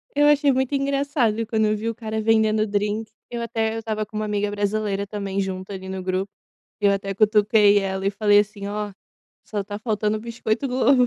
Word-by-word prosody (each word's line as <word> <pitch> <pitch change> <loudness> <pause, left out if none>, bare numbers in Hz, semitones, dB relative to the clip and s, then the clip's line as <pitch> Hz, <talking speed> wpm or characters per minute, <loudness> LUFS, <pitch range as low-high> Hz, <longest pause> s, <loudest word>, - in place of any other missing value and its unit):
Eu 290 0 +5
achei 290 -1 +5
muito 265 +1 0
engraçado 275 -5 +1
quando 220 -1 +1
eu 210 0 +1
vi 220 +2 -4
o 230 - 0
cara 220 -2 -4
vendendo 220 -1 +3
drinque, 210 +1 -2 0.2
eu 240 -1 -4
até 225 -1 -1
eu 225 - -2
estava 215 -1 -3
com 215 - -14
uma 215 - -1
amiga 205 -1 -1
brasileira 205 -1 -1
também 200 -1 -4
junto 190 0 -3
ali 190 -1 -7
no 190 0 -4
grupo 185 +2 -2 0.5
e 205 - +3
eu 200 - +5
até 195 0 -2
cutuquei 210 0 +5
ela 190 0 -2
e - - +3
falei 205 0 +4
assim: 205 -1 -5
"Ó, 210 0 -3 0.5
só 210 -2 -3
está 205 +1 -5
faltando 215 -1 -1
biscoito 230 +2 -2
Globo". 255 0 +4
215 Hz, 205 wpm, -23 LUFS, 200-225 Hz, 0.5 s, Eu